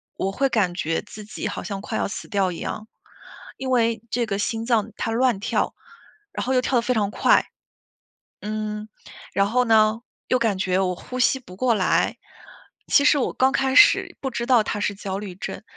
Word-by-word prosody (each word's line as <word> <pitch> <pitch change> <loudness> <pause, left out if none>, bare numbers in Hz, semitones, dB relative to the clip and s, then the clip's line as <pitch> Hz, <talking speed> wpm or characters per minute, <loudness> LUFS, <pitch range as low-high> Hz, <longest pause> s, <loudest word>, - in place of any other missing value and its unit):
我 195 - -2
会 275 +7 +1
感 200 -7 +1
觉 165 -2 -1
自 210 -1 -11
己 215 - -5
好 - - -5
像 200 -1 -5
快 - - -4
要 - - 0
死 200 - -7
掉 195 -3 +1
一 - - -8
样。 215 +1 -5 0.7
因 265 - -4
为， 230 -3 +2
这 240 0 0
个 200 -2 -3
心 225 +1 -2
脏 225 -3 +1
它 225 - -2
乱 240 -2 +2
跳， - - -1 0.6
然 - - -4
后 260 - 0
又 255 - +3
跳 255 0 +1
得 - - +3
非 250 - 0
常 205 -3 0
快。 - - +3 0.9
嗯， 215 0 -4 0.5
然 195 0 +2
后 250 +2 +2
呢， 220 0 +4 0.3
又 255 - +3
感 210 -4 +1
觉 185 -1 +1
我 185 -1 +1
呼 255 +7 -7
吸 265 +1 +3
不 185 -7 -13
过 250 0 +2
来。 190 -3 +1 0.7
其 285 - +4
实 295 - +5
我 265 - 0
刚 260 +1 +3
开 265 0 +1
始 415 - +5
不 270 - -2
知 235 0 -3
道 240 -4 +4
它 210 - -3
是 200 -1 -1
焦 195 -1 -4
虑 200 -3 -7
症， 195 - -7
220 Hz, 220 characters per minute, -23 LUFS, 200-250 Hz, 0.9 s, 实